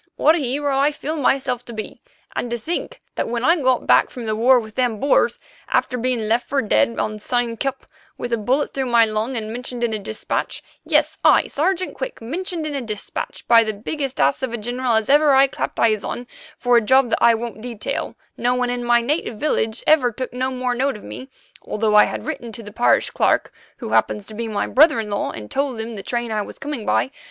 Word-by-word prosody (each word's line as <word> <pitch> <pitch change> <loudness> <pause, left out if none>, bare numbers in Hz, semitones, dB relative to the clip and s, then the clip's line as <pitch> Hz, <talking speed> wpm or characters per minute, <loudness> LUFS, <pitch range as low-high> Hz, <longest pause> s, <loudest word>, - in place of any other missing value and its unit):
what 310 - +4
a 340 - 0
hero 280 +1 -1
I 280 +2 +3
feel 300 +1 -4
myself 265 -4 0
to 235 - -9
be. 220 -1 -7 0.3
And 245 - -2
to 240 - -2
think 325 +10 -5
that - - -2
when 235 +1 -1
I 335 - +5
got 255 -1 +2
back - - +4
from 245 -2 -7
the 215 -1 -1
war 245 +3 +5
with 220 -2 -9
them 240 -3 0
Boers, 280 - +2 0.3
after 250 - +1
being 250 -1 0
left 230 +3 +1
for 280 - +1
dead 230 0 +2
on 215 0 -2
Spion 240 +1 -1
Kop 270 +3 -3 0.4
with 240 -1 -4
a - - +2
bullet 255 +7 0
through 265 -1 -2
my 235 -1 +5
lung 220 +4 -2
and 220 0 -4
mentioned 245 0 -5
in 230 -2 0
a 215 - -2
dispatch—yes, 215 +2 -2
I, - - +5
Sergeant 370 +5 -1
Quick, - - -6
mentioned 330 +7 -4
in 305 - -3
a 280 - -2
dispatch 215 -4 -6
by 230 -1 +7
the 215 -1 -2
biggest 270 +5 -4
ass 140 - +2
of 260 -3 -2
a - - -2
general 245 +2 -1
as 220 -1 +1
ever 290 0 +5
I 270 +1 +7
clapped 275 - -4
eyes 215 -2 +2
on, 245 - -5 0.3
for 245 -1 +3
a - - +4
job 260 +2 +3
that - - +1
I 235 -1 +6
won't 225 -2 -6
detail, 235 -3 -4 0.2
no 245 +1 +1
one 250 -1 0
in 245 0 -3
my 240 0 +4
native 255 -2 -1
village 225 -7 -1
ever 275 -6 +4
took 255 +3 -6
no 255 +1 -1
note 255 0 -1
of - - -14
me, 265 - -9 0.3
although 215 0 -1
I 210 - +8
had - - -5
written 270 -7 -5
to 230 - -8
the 210 - -10
parish 240 - +2
clerk, - - +1 0.2
who - - -6
happens 210 - +1
to 215 - -9
be 230 +2 -4
my 210 -2 -1
brother 300 -2 +5
in 210 -2 -4
law, 205 - -1
and 105 -2 -8
told 275 -4 -1
him 225 +1 -5
the 205 - -6
train 235 +2 -3
I 215 -1 0
was - - -8
coming 280 -6 -5
by. 265 - +1
245 Hz, 230 wpm, -21 LUFS, 225-270 Hz, 0.4 s, I